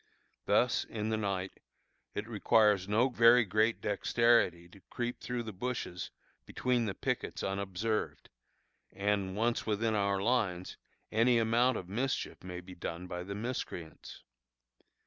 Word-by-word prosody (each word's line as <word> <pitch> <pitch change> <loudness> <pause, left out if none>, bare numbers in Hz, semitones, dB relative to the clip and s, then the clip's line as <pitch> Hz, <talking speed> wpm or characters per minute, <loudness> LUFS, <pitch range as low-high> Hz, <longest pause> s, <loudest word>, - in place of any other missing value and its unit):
Thus, - - +3
in 110 -1 -4
the 110 - 0
night, 95 -3 -3 0.6
it - - -3
requires 105 -4 +3
no 115 +5 +4
very 120 -1 +6
great 110 +3 +1
dexterity 105 -4 +2
to 95 +2 -17
creep 120 0 -3
through 125 -1 -3
the 110 -2 -7
bushes 95 -4 -4 0.4
between 125 -2 0
the 100 -3 -3
pickets 125 -2 -3
unobserved, 100 +3 -2 0.6
and, 100 -1 -1
once 115 +2 0
within 110 +1 +1
our 100 -2 +1
lines, 100 -5 0 0.4
any 115 +2 +4
amount 115 +2 +3
of 90 - -6
mischief 125 +3 -2
may 90 -1 -6
be 90 +1 -11
done 85 0 -5
by 90 -1 -5
the 100 +2 -6
miscreants. 105 - -6
105 Hz, 135 wpm, -32 LUFS, 95-115 Hz, 0.6 s, very